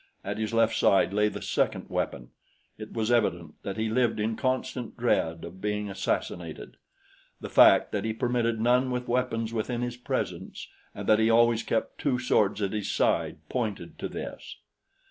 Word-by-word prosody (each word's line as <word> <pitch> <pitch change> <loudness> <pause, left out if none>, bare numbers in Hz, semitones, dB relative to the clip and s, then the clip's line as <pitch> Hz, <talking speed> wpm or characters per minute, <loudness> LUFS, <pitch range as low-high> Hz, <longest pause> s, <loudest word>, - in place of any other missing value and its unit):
At - - -4
his 110 -1 -2
left 115 -1 +3
side 100 0 +3
lay 105 +1 +3
the - - -7
second - - 0
weapon. - - -3 0.4
It 110 0 -9
was 110 0 -1
evident 85 -9 +1
that 100 -1 -5
he 110 0 0
lived 120 0 +1
in 110 +1 0
constant 130 -1 -2
dread 80 0 0
of 95 - -11
being 105 -1 -2
assassinated. 95 0 -3 0.6
The - - -7
fact - - +6
that 100 - -2
he 110 - -1
permitted 115 0 0
none 125 +3 +3
with 125 0 -3
weapons 120 -2 -1
within 120 +2 -2
his 120 0 -4
presence 125 - -4 0.3
and - - -6
that 110 0 +5
he 110 0 +3
always 115 0 +4
kept 115 - -2
two 135 -4 +1
swords 105 -4 +1
at 100 - -1
his 105 -2 -2
side - - 0
pointed 110 -6 -4
to - - -3
this. - - -7
110 Hz, 175 wpm, -27 LUFS, 105-120 Hz, 0.6 s, fact